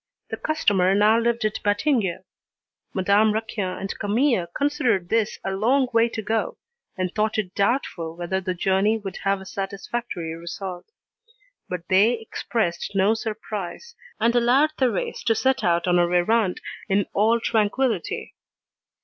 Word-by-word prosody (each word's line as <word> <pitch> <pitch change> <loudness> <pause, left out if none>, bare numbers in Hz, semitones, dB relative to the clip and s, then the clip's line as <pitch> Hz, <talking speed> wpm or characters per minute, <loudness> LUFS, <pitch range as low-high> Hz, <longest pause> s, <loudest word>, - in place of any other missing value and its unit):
The - - -3
customer 195 -12 +2
now 215 +3 +5
lived 235 -1 0
at 215 - -1
Batignolles. 205 - +1 0.7
Madame 200 +3 +3
Raquin 215 -4 -3
and 195 +1 -5
Camille 220 -2 +1
considered 230 - 0
this 225 -2 +1
a 195 - -2
long 250 +7 +2
way 230 +1 +4
to 220 -1 -5
go, 225 - -1 0.4
and 185 -1 -2
thought 215 +1 0
it 190 -4 -2
doubtful 195 -7 -1
whether 175 +2 -2
the 185 -1 -3
journey 195 +4 +2
would 195 -3 -7
have 195 0 0
a 190 - -10
satisfactory 195 -2 -4
result; 175 +2 -7 0.8
but 180 -1 -5
they 200 +5 +4
expressed 220 -5 -3
no 195 +3 +4
surprise, 220 - -5 0.3
and 230 +2 +2
allowed 255 +6 +4
Thérèse 245 -7 -1
to 225 - +3
set 260 +3 +1
out 170 0 +2
on 175 0 +4
her 175 0 +2
errand 185 +2 +2 0.3
in 195 +1 +2
all 225 +3 +3
tranquillity. 220 -2 0
205 Hz, 145 wpm, -24 LUFS, 185-230 Hz, 0.8 s, now